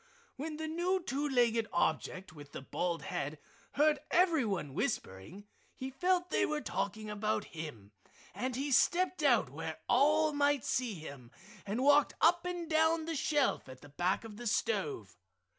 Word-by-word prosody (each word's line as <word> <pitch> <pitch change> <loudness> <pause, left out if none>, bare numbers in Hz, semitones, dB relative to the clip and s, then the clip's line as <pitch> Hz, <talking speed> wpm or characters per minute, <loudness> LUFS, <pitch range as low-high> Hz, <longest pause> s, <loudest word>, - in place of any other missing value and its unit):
When 300 +3 -5
the 315 0 -4
new 350 +4 0
two 290 -1 -2
legged 235 -4 +2
object 170 +1 -1
with 145 -2 -13
the - - -6
bald 170 +4 -2
head 145 +2 -4 0.4
heard 300 +1 +3
everyone 245 - +2
whispering 135 - -4 0.3
he 260 +1 -6
felt 360 +5 0
they - - +2
were 300 0 0
talking 200 -2 -3
about 210 +1 -1
him, 145 -11 -8 0.4
and 250 +6 -3
he 280 +2 -2
stepped 340 +7 +3
out 240 - +3
where 160 +2 -5
all 305 +4 +4
might 285 -3 +2
see 240 -4 -1
him, 140 -7 -10 0.4
and 220 +6 -1
walked 290 +1 +5
up 345 +2 +4
and 355 -2 -3
down 320 0 +2
the 330 0 -3
shelf 290 - +1
at 130 0 -11
the 145 - -13
back 175 +9 0
of 215 -2 -10
the 240 +1 -5
stove. 420 - -1
255 Hz, 160 wpm, -33 LUFS, -, 0.4 s, walked